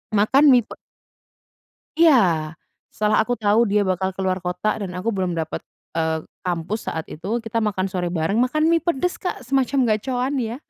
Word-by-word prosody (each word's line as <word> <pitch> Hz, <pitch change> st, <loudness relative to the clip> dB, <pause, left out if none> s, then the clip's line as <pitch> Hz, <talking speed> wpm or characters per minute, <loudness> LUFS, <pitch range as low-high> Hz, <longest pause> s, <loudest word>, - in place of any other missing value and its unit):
Makan 265 Hz, +8 st, +4 dB
mie 245 Hz, -2 st, +5 dB
pe -, -, -11 dB, 1.2 s
Iya, 185 Hz, -, +4 dB, 0.4 s
setelah 210 Hz, 0 st, +2 dB
aku 245 Hz, +3 st, -1 dB
tahu 215 Hz, +1 st, +2 dB
dia 205 Hz, 0 st, +2 dB
bakal 190 Hz, 0 st, -1 dB
keluar 190 Hz, -1 st, -1 dB
kota 180 Hz, +3 st, -2 dB
dan 195 Hz, -4 st, -5 dB
aku 185 Hz, +5 st, -2 dB
belum 185 Hz, -4 st, -2 dB
dapet, 160 Hz, -1 st, -3 dB, 0.4 s
eee, 160 Hz, -1 st, 0 dB, 0.2 s
kampus 180 Hz, +5 st, -3 dB
saat 160 Hz, -, -3 dB
itu, 200 Hz, +9 st, -3 dB
kita 225 Hz, 0 st, -3 dB
makan 200 Hz, -3 st, -1 dB
sore 180 Hz, -2 st, -2 dB
bareng, 165 Hz, +6 st, 0 dB
makan 305 Hz, +6 st, +2 dB
mie 335 Hz, -, +4 dB
pedas 345 Hz, +1 st, -1 dB
Kak 360 Hz, -, -4 dB
semacam 270 Hz, +2 st, 0 dB, 0.2 s
Gacoan 250 Hz, +5 st, -2 dB
ya. 230 Hz, -1 st, -3 dB
210 Hz, 170 wpm, -22 LUFS, 180-245 Hz, 1.2 s, mie